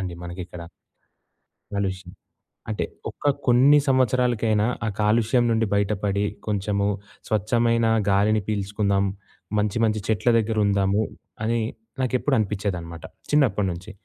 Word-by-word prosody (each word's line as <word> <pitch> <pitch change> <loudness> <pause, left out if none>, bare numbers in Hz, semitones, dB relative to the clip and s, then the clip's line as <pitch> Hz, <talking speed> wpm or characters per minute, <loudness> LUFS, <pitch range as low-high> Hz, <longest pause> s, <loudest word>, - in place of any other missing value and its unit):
అండి 90 -2 -4
మనకిక్కడ. 90 0 -7 1.1
కాలుష్యం. 95 -2 -3 0.6
అంటే 110 - -1 0.2
ఒక్క - - -13 0.2
కొన్ని 130 +4 +6
సంవత్సరాలకైనా 120 -4 +2 0.2
ఆ - - 0
కాలుష్యం 115 +3 +3
నుండి 115 0 +2
బయటపడి 100 0 0 0.2
కొంచెము 100 -1 0 0.4
స్వచ్ఛమైన 115 +2 +2 0.2
గాలిని 105 +2 +3
పీల్చుకుందాం. 100 -1 0 0.5
మంచి 105 +1 0
మంచి 110 -1 0
చెట్ల 110 +2 +2
దగ్గరుందాము 105 -2 +1 0.4
అని 115 +1 +1 0.4
నాకెప్పుడూ 130 +2 +1
అనిపిచ్చేదనమాట 95 -5 -3 0.3
చిన్నప్పడినుంచి. 100 - +1
105 Hz, 100 wpm, -24 LUFS, 100-115 Hz, 1.1 s, కొన్ని